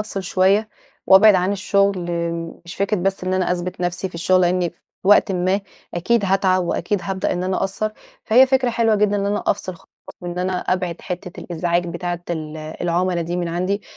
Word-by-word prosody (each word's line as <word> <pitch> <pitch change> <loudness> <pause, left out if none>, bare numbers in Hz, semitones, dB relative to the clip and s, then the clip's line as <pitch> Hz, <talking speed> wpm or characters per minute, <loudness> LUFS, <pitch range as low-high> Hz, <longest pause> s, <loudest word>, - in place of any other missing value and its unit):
أفصل 210 -2 -4
شوية 195 +4 +2 0.4
وابعد 200 +2 +7
عن 185 +1 +2
الشغل، 195 -2 +1 0.5
مش 170 - -9
فكرة 200 +2 0
بس 190 0 -1
إن 185 - 0
أنا 185 -1 +1
أثبت 180 0 -4
نفسي 175 +2 -2
في 180 - -20
الشغل 185 +2 +2
لإني 180 -1 +1
في 170 - -32 0.3
وقتٍ 205 0 +5
ما 185 +2 +1 0.3
أكيد 200 +5 +1
هاتعب 185 -1 +2
وأكيد 180 +3 -1
هابدأ 190 -1 -2
إن 180 - -2
أنا 185 0 0
أقصّر. 195 +3 -1 0.3
فهي 250 +4 +6
فكرة 260 -1 +2
حلوة 230 -1 +2
جدًا 205 0 +2
إن 200 0 -1
أنا 205 +1 -1
أفصل 185 -2 -1
خالص 190 - -21 0.3
وإن 175 -1 -5
أنا 185 +1 -1
أبعد 180 -2 -2
حتّة 180 0 -6
الإزعاج 175 0 -1
بتاعة 175 0 -4
ال 155 -2 -4
العُملا 170 +3 -1
دي 175 +2 -3
من 175 -1 -2
عندي. 185 +4 -1
185 Hz, 190 wpm, -21 LUFS, 175-200 Hz, 0.5 s, وابعد